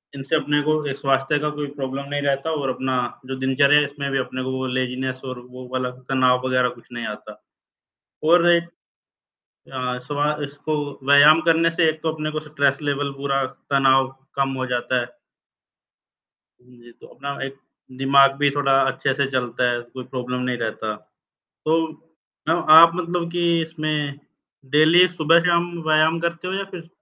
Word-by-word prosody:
इनसे 135 +3 -2
अपने 145 -1 +1
को 155 +1 +2
एक 135 - -4
स्वास्थ्य 135 +1 +1
का 150 0 -1
कोई 145 - -3
प्रॉब्लम 135 +1 -4
नहीं 145 0 -2
रहता 140 +3 -1
और 135 -2 -2
अपना 130 0 -2 0.3
जो 130 - -4
दिनचर्या 140 +2 +4
है, 150 - +1
इसमें 140 0 -5
भी 135 - 0
अपने 130 0 -4
को 130 - -3
वो 130 - -3
लेज़ीनेस 130 0 -3
और 130 -1 -6
वो 125 0 -10
वाला 130 -1 -1 0.2
तनाव 130 -1 +3
वगैरह 130 -1 +2
कुछ - - -23
नहीं 120 -1 -5
आता। - - -14 0.9
और 175 0 +5
एक 170 0 +2 1.0
अ, 125 -1 -3
सुबह 145 +1 -1
इसको 145 +2 -6 0.3
व्यायाम 145 +3 +7
करने 165 0 +3
से 165 0 +2
एक 155 0 -2
तो 160 - 0
अपने 155 -1 -4
को 155 0 -4
स्ट्रेस 145 -2 0
लेवल 145 -1 -1
पूरा 135 -1 0 0.3
तनाव 135 -1 +3 0.3
कम 135 -1 +1
हो 130 - -2
जाता 125 +1 0
है। 120 - -4 1.6
हाँ 125 - -26
जी, 120 0 -16
तो - - -17
अपना 140 +2 -7
एक 135 0 -8 0.4
दिमाग 135 +1 +5
भी 145 0 +3
थोड़ा 140 -1 0 0.2
अच्छे 135 - -1
से 140 +1 0
चलता 125 -1 0
है, 120 - -2
कोई 125 +2 -10
प्रॉब्लम 125 0 -5
नहीं 125 -1 -2
रहता। 110 -1 -4 0.7
तो 160 +1 +2 0.7
न, - - +4 0.2
आप 165 +2 +9
मतलब 175 -1 -2
की 175 0 -1 0.2
इसमें 155 -3 -3 0.6
डेली 160 +4 +6
सुबह-शाम 170 +1 +2 0.2
व्यायाम 155 +1 +3
करते 170 +1 -3
हो 190 - -3
या 195 - -2
फिर 170 -3 -9
140 Hz, 175 wpm, -22 LUFS, 130-155 Hz, 1.6 s, आप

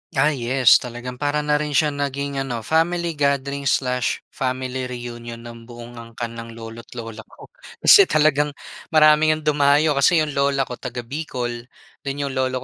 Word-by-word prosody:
Ah, 145 +2 +2
yes. 125 0 +4
Talagang 125 +1 -3
para 145 +3 -1
na 150 0 +1
rin 150 0 -2
siyang 145 +1 +2
naging, 140 0 -4
ano, 120 -3 -4
family 165 +6 0
gathering 140 -1 -1
slash 125 -2 0
family 130 0 -3
reunion 120 -2 -7
ng 115 0 -11
buong 120 0 -11
angkan 115 0 -7
ng 115 0 -8
lolo't 115 0 -10
lola 115 -1 -8
ko. - - -16 0.3
Kasi 400 - +8
talagang 150 -1 +2 0.4
marami 155 0 +5
ngang 155 0 -2
dumayo 145 +1 +3
kasi 160 +5 +4
'yong 150 - -4
lola 140 0 +1
ko 125 - -6
taga-Bicol 120 -2 -5 0.4
then 140 -1 -4
'yong 140 -1 -3
lolo 130 -1 -1
135 Hz, 160 wpm, -21 LUFS, 120-150 Hz, 0.4 s, Kasi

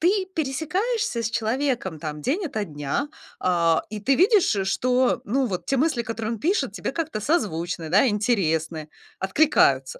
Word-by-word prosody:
Ты 375 +3 +2
пересекаешься 320 - -1
с 225 - -1
человеком 235 - -1
там 150 -1 -5
день 335 - 0
ото 220 -8 -3
дня, 150 - -3 0.4
э, 170 -2 +3
и 210 -1 -5
ты 270 +7 +2
видишь, 375 - +4 0.2
что, 255 0 +2
ну, 265 +5 0
вот 185 -6 -4
те 270 - +1
мысли, 265 -3 +1
которые 225 -1 -4
он - - -8
пишет, 370 - 0
тебе - - -4
как-то 320 -10 -3
созвучны, 175 - -1
да, 205 +9 +5
интересны, 165 -8 0 0.3
откликаются. 190 - +3
230 Hz, 155 wpm, -24 LUFS, 180-295 Hz, 0.4 s, да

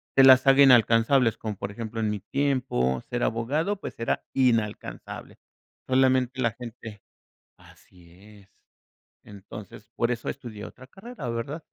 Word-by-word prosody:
te 135 - +7
las 130 0 +7
haga 135 +1 +7
inalcanzables, 120 -1 +4
como 105 -3 -5
por 100 - -5
ejemplo, 115 +1 -6
en 110 - 0
mi 105 -1 -3
tiempo, 125 - -1
ser 120 0 -4
abogado, 150 - -1
pues, - - -8
era 115 - -1
inalcanzable. 115 -5 -2 0.5
Solamente 130 0 +2
la 115 -2 +2
gente 115 -3 -10 0.6
Así 85 -2 -20 0.3
es. 100 -1 -22 0.8
Entonces, 100 +1 -12
por 120 - +1
eso 115 -1 -5
estudié 110 -3 -8
otra 130 - -12
carrera, 205 - -9
¿verdad? 125 +8 -5
120 Hz, 140 wpm, -26 LUFS, 105-130 Hz, 0.8 s, te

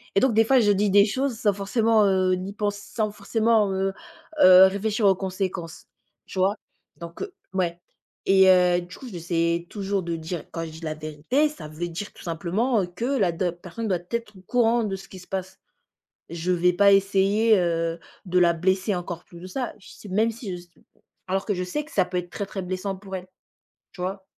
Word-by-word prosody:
Et - - +6
donc, 260 0 +3
des 225 - +6
fois 265 +1 +5
je 205 -3 +4
dis 205 0 +2
des 200 +1 +7
choses 255 +2 -2
sans 205 -2 +2
forcément, 215 +2 +2
heu, 185 -1 +2
ni 185 +2 -6
pens 205 -1 -1
sans 215 +1 -3
forcement, 220 -1 +1
heu 195 0 0 0.5
heu, 185 +1 +9
réfléchir 210 +2 -1
aux 190 - +5
conséquences. 185 -3 -4 0.4
Tu - - -9
vois? 195 +3 +3 0.4
Donc, 170 0 -9
heu, 400 - -7 0.2
ouais. 175 -2 -1 0.5
Et 190 0 +6
heu, 180 -1 +5
du 175 +1 -11
coup 260 - -10
j'essaie 170 -1 -1
toujours 200 -1 -2
de 170 -1 -3
dire 165 +1 -5
quand 165 - -4
je - - -7
dis 160 - -11
la 155 -1 -3
vérité, 155 - 0
ça 295 - -9
veut 165 +3 -5
dire 195 +5 -6
tout - - -14
simplement, 190 +8 0
heu, - - -1
que 175 +5 -8
la 245 -10 +2
d'op 175 +1 -3
personne 215 +6 -5
doit 180 -2 +1
être 230 -4 -4
au - - -14
courant 235 +3 +2
de 195 -2 -2
ce 190 - -11
qui 190 - -10
se 180 - -15
passe. 190 0 -5 0.7
Je 170 +2 -1
vais 180 0 +3
pas 200 +3 +5
essayer, 200 +3 +3
heu, 165 -1 0 0.3
de 180 +1 +1
la 175 -1 +5
blesser 190 +4 +1
encore 175 -1 -5
plus 170 -1 -14
que 185 - -8
ça. 250 +4 -3
Je - - -16
s - - -15
même 220 +4 +2
si 225 -3 -7
je 175 - -10
s 175 - -21 0.6
alors 190 +1 -1
que 205 - 0
je 180 - -2
sais 290 +12 -3
que 315 - -17
ça 185 - +3
peut 180 0 -3
être 175 0 -5
très 200 - -4
très 195 -1 -5
blessant 185 +2 -3
pour 195 0 -7
elle, 180 0 -8 0.7
tu 195 - -12
vois? 190 +1 -4
190 Hz, 220 wpm, -25 LUFS, 175-210 Hz, 0.7 s, heu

